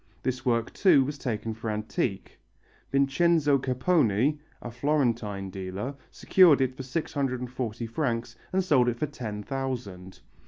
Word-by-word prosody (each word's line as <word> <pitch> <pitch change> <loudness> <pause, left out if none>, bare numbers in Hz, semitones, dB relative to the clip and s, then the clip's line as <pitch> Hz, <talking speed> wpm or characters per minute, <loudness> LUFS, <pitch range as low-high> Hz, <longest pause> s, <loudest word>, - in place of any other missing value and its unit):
This 130 -1 -2
work, 115 -2 0
too, 170 -9 +5
was 145 +1 -5
taken 110 -2 -3
for 115 0 -5
antique. 105 -1 -3 0.5
Vincenzo 140 +1 +3
Capponi, 130 - +2 0.2
a 120 - -7
Florentine 115 -7 -1
dealer, 95 +7 -5 0.2
secured 175 -7 +5
it 130 -1 +1
for - - -6
640 130 -5 -3
francs 115 -2 -2 0.2
and 190 0 +1
sold 130 -9 +3
it 120 - -3
for 150 - 0
ten 115 -8 -6
thousand. 115 -9 -5
125 Hz, 130 wpm, -27 LUFS, 110-140 Hz, 0.5 s, too